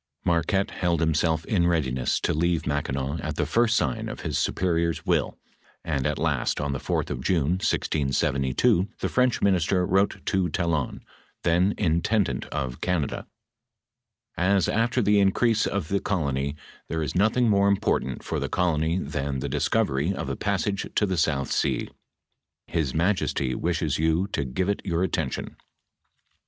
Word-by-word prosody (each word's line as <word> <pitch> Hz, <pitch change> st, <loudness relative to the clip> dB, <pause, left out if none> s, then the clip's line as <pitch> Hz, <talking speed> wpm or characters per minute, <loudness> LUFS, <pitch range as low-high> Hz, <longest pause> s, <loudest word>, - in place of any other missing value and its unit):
Marquette 90 Hz, +4 st, +1 dB
held 85 Hz, -2 st, 0 dB
himself 80 Hz, 0 st, +1 dB
in 85 Hz, -5 st, +2 dB
readiness 65 Hz, -7 st, 0 dB
to -, -, 0 dB
leave 85 Hz, +1 st, 0 dB
Mac 75 Hz, -1 st, -1 dB
kinaw 70 Hz, +4 st, -3 dB
at -, -, -4 dB
the -, -, 0 dB
first 115 Hz, 0 st, +2 dB
sign 65 Hz, -5 st, -1 dB
of -, -, -7 dB
his -, -, -3 dB
superior's 85 Hz, -2 st, 0 dB
will, -, -, 0 dB, 0.5 s
and 70 Hz, -4 st, 0 dB
at 75 Hz, -, -1 dB
last 75 Hz, -6 st, 0 dB
on 70 Hz, -1 st, -1 dB
the 65 Hz, -, -3 dB
4th -, -, -2 dB
of 65 Hz, -, -4 dB
June, 85 Hz, +2 st, +1 dB
1672, 70 Hz, -, +1 dB
the -, -, -1 dB
French 125 Hz, -1 st, +1 dB
minister 90 Hz, -1 st, +2 dB
wrote 95 Hz, +2 st, +1 dB
to 95 Hz, -3 st, +1 dB
Talon, 80 Hz, -5 st, -2 dB, 0.4 s
then 90 Hz, +4 st, +2 dB
intendant 90 Hz, +3 st, +1 dB
of 65 Hz, -4 st, -4 dB
Canada: 90 Hz, -6 st, -1 dB, 0.6 s
" -, -, -49 dB, 0.2 s
As 95 Hz, -, +2 dB
after 115 Hz, +2 st, +1 dB
the 105 Hz, 0 st, +4 dB
increase 110 Hz, +3 st, +3 dB
of 100 Hz, -6 st, -2 dB
the 100 Hz, -, +1 dB
colony 70 Hz, -8 st, -1 dB, 0.3 s
there 80 Hz, -1 st, -2 dB
is 70 Hz, -, -3 dB
nothing 110 Hz, +6 st, +3 dB
more 100 Hz, -2 st, +4 dB
important 95 Hz, -9 st, 0 dB
for -, -, -2 dB
the -, -, -3 dB
colony 85 Hz, -1 st, +1 dB
than 70 Hz, -4 st, -3 dB
the 65 Hz, -, -3 dB
dis -, -, 0 dB
co^'^ry 70 Hz, +8 st, +1 dB
cf -, -, -4 dB
a -, -, -2 dB
passage 100 Hz, 0 st, -1 dB
to 105 Hz, -, +3 dB
the 95 Hz, -2 st, -1 dB
south 75 Hz, -4 st, 0 dB
sea, -, -, 0 dB, 0.8 s
his 80 Hz, -6 st, -2 dB
majesty 80 Hz, -7 st, 0 dB
wishes 85 Hz, -4 st, -1 dB
you 80 Hz, +3 st, +2 dB
' -, -, -27 dB
to 70 Hz, -, -1 dB
give 80 Hz, +9 st, -2 dB
it 100 Hz, -, -1 dB
your 85 Hz, -2 st, 0 dB
attention." 95 Hz, -, -3 dB
85 Hz, 165 wpm, -25 LUFS, 75-95 Hz, 0.8 s, the